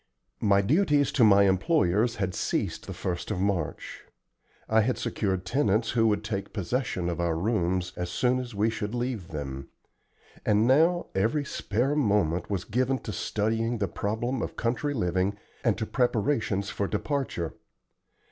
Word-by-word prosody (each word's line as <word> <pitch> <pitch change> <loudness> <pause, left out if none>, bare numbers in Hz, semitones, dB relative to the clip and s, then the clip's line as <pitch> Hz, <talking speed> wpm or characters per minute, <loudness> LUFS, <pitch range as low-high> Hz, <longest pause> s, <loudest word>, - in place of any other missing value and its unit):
My 100 -1 +4
duties 145 - +3
to 125 - +3
my 100 -2 +7
employers 100 - +2
had 95 -3 -2
ceased - - -2
the - - -5
1st 90 -1 -4
of 105 -4 -2
March: 95 -5 -2 0.7
I 110 0 +4
had 125 +4 0
secured 95 -3 -2
tenants 110 -1 +1
who 115 -1 +3
would 105 0 +1
take 100 -2 -4
possession 105 -2 -2
of 85 -1 -2
our 85 -1 +1
rooms 90 -2 0
as 90 -1 -3
soon 125 +7 +1
as 120 -3 -6
we 105 +3 +2
should 105 0 -4
leave 120 -7 -3
them; 70 -4 -6 0.7
and 105 +1 +3
now 165 +7 +4
every 115 +10 +1
spare 125 +4 -1
moment 100 - +1
was 95 -3 -1
given 130 +4 0
to 105 - -5
studying 115 +5 -1
the 100 -2 0
problem 115 +6 -2
of - - -4
country 125 +5 -1
living 95 -1 0 0.3
and 115 -4 +2
to 110 - -2
preparations 110 -5 0
for 100 - -1
departure. 105 - -2
105 Hz, 155 wpm, -27 LUFS, 95-125 Hz, 0.7 s, my